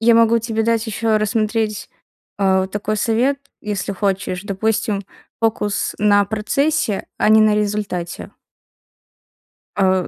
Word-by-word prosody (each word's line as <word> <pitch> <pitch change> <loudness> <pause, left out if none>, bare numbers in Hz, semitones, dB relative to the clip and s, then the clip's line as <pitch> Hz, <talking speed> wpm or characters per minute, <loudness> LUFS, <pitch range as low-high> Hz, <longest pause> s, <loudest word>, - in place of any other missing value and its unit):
я 230 +1 +5
могу 230 0 +5
тебе 225 -1 -2
дать 230 0 +1
еще 220 0 0
рассмотреть, 215 0 -1 0.5
а, 190 -1 +2
такой 205 +2 -3
совет, 240 +6 +1 0.2
если 205 -1 -3
хочешь. 190 -2 -2
Допустим, 205 0 -1 0.4
фокус 215 -2 0
на 205 -1 +4
процессе, 220 +2 0
а - - +2
не 220 0 +7
на 215 -1 +4
результате. 205 -4 -3 1.5
А,. 190 -2 +2
210 Hz, 120 wpm, -19 LUFS, 200-225 Hz, 1.5 s, не